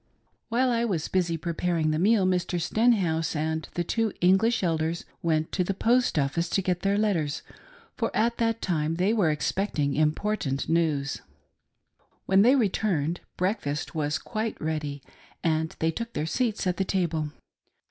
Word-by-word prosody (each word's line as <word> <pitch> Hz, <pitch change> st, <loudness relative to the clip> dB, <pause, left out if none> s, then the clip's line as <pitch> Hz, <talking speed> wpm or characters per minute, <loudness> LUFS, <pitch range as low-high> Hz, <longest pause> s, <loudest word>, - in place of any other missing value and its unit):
While 250 Hz, +2 st, +2 dB
I 235 Hz, 0 st, +1 dB
was 185 Hz, -9 st, -1 dB
busy 175 Hz, -3 st, 0 dB
preparing 165 Hz, -1 st, 0 dB
the 155 Hz, -, 0 dB
meal, 200 Hz, +1 st, +4 dB
Mr. 180 Hz, -1 st, 0 dB
Stenhouse 175 Hz, -5 st, +1 dB
and 160 Hz, +1 st, -2 dB
the 175 Hz, -, 0 dB
two 225 Hz, +4 st, 0 dB
English 195 Hz, +6 st, +3 dB
Elders 165 Hz, 0 st, -1 dB, 0.2 s
went 160 Hz, -1 st, 0 dB
to 180 Hz, -, +1 dB
the 195 Hz, +2 st, -2 dB
post 240 Hz, 0 st, +2 dB
office 150 Hz, +4 st, 0 dB
to 195 Hz, -, 0 dB
get 180 Hz, -1 st, 0 dB
their 200 Hz, +2 st, +1 dB
letters, 170 Hz, -9 st, 0 dB, 0.5 s
for 230 Hz, -, 0 dB
at 235 Hz, +2 st, +1 dB
that 230 Hz, -1 st, 0 dB
time 160 Hz, -3 st, 0 dB
they 185 Hz, +5 st, +2 dB
were 200 Hz, -8 st, +3 dB
expecting 150 Hz, -2 st, 0 dB
important 155 Hz, -1 st, 0 dB
news. 155 Hz, -4 st, 0 dB, 1.0 s
When 190 Hz, 0 st, +4 dB
they 250 Hz, +6 st, +6 dB
returned, 185 Hz, -, 0 dB, 0.2 s
breakfast 175 Hz, -6 st, -2 dB
was 150 Hz, -2 st, 0 dB
quite 220 Hz, +8 st, -4 dB
ready, 150 Hz, -3 st, -3 dB, 0.4 s
and 160 Hz, -1 st, 0 dB
they 160 Hz, 0 st, +1 dB
took 230 Hz, +6 st, -5 dB
their 150 Hz, -, -2 dB
seats 225 Hz, +5 st, -1 dB
at 180 Hz, -1 st, 0 dB
the 195 Hz, -, +1 dB
table. 170 Hz, -5 st, -1 dB
175 Hz, 155 wpm, -27 LUFS, 155-210 Hz, 1.0 s, they